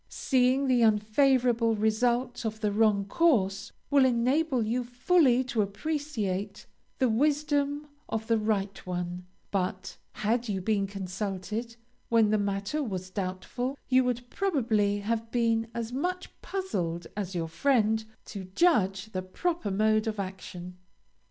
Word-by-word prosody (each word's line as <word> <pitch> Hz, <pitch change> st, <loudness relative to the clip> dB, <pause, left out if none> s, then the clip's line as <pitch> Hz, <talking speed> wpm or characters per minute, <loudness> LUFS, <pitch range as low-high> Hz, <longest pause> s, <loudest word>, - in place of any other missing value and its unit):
Seeing 260 Hz, +1 st, +2 dB
the 255 Hz, -2 st, +3 dB
unfavorable 230 Hz, +2 st, +3 dB
result 240 Hz, +4 st, +1 dB
of 220 Hz, -1 st, -3 dB
the 210 Hz, -2 st, +1 dB
wrong 205 Hz, -1 st, +3 dB
course 200 Hz, -, +1 dB, 0.2 s
will 280 Hz, -1 st, +6 dB
enable 260 Hz, +2 st, +2 dB
you 245 Hz, +3 st, 0 dB
fully 255 Hz, +1 st, +3 dB
to 245 Hz, -3 st, -1 dB
appreciate 210 Hz, -4 st, -3 dB, 0.3 s
the 260 Hz, -, +3 dB
wisdom 290 Hz, +3 st, +1 dB, 0.2 s
of 220 Hz, 0 st, -2 dB
the 225 Hz, 0 st, +2 dB
right 205 Hz, -2 st, 0 dB
one, 180 Hz, 0 st, -4 dB, 0.2 s
but, 190 Hz, -1 st, -2 dB, 0.2 s
had 230 Hz, +2 st, -1 dB
you 195 Hz, -2 st, -1 dB
been 200 Hz, +1 st, 0 dB
consulted 200 Hz, +4 st, -4 dB, 0.3 s
when 225 Hz, -2 st, +4 dB
the 215 Hz, -, +3 dB
matter 200 Hz, +8 st, -1 dB
was 185 Hz, -7 st, -4 dB
doubtful, 200 Hz, +8 st, -3 dB
you 260 Hz, 0 st, +5 dB
would 245 Hz, -1 st, -2 dB
probably 220 Hz, -, +1 dB
have 225 Hz, +2 st, -2 dB
been 230 Hz, -1 st, +1 dB
as 235 Hz, 0 st, -4 dB
much 360 Hz, +7 st, -2 dB
puzzled 175 Hz, -, -3 dB
as 195 Hz, -3 st, -4 dB
your 165 Hz, -1 st, -1 dB
friend 220 Hz, -, +2 dB, 0.2 s
to 195 Hz, -3 st, -7 dB
judge 195 Hz, -, +2 dB
the 185 Hz, -, -2 dB
proper 325 Hz, -, -2 dB
mode 215 Hz, +2 st, +2 dB
of 215 Hz, -2 st, -2 dB
action. 180 Hz, -2 st, -7 dB
220 Hz, 135 wpm, -28 LUFS, 195-255 Hz, 0.3 s, will